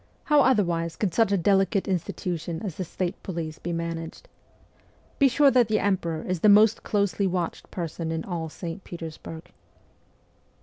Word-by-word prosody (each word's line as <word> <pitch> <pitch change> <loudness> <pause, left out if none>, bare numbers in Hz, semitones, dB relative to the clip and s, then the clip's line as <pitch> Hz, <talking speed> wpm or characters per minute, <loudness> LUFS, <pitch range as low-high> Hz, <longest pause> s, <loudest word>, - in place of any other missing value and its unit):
How 295 -2 +4
otherwise 175 -10 +2
could 195 -6 -1
such 225 -3 +3
a 200 - +3
delicate 195 +2 +2
institution 175 -2 -3
as 195 -5 -3
the 185 - -4
state 180 +1 -4
police 165 -4 -5
be 175 - -4
managed? 165 - -5 0.9
Be 280 - +6
sure 275 +2 +4
that 245 -3 +4
the 215 0 +2
emperor 175 -6 -1
is 185 -1 -2
the 210 - +5
most 215 +2 +6
closely 200 -2 0
watched 175 -2 -3
person 165 -1 -4
in 160 0 -2
all 165 -3 -4
St. 170 +4 -7
Petersburg.' 165 -1 -8
180 Hz, 160 wpm, -26 LUFS, 165-205 Hz, 0.9 s, Be